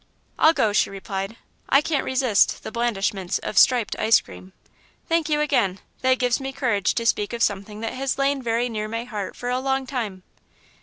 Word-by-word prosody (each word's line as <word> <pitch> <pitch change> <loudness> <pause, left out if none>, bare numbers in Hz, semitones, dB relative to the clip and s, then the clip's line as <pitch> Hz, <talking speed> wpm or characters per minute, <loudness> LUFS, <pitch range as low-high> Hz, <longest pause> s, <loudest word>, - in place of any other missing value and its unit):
"I'll 315 - +6
go," 215 -9 +1
she - - +3
replied, 195 +2 -5 0.3
"I 275 - +6
can't 295 -2 -1
resist 255 -6 +2
the - - -6
blandishments 205 -5 -1
of 200 - 0
striped 250 -4 +4
ice 220 0 +5
cream." 90 +1 -13 0.6
"Thank 330 -2 +1
you 300 0 +2
again; 240 -11 +1 0.2
that 260 0 +3
gives 250 0 +1
me 270 0 -4
courage 230 -8 0
to 230 - -1
speak 210 -1 +1
of 235 0 0
something 205 +2 -2
that 225 - -3
has 265 0 -2
lain 275 0 +1
very 235 0 0
near 215 -3 -3
my 230 +2 -3
heart 210 -5 -5
for 245 - -5
a 250 - 0
long 265 0 -1
time." 220 -9 -4
235 Hz, 195 wpm, -23 LUFS, 205-265 Hz, 0.6 s, I'll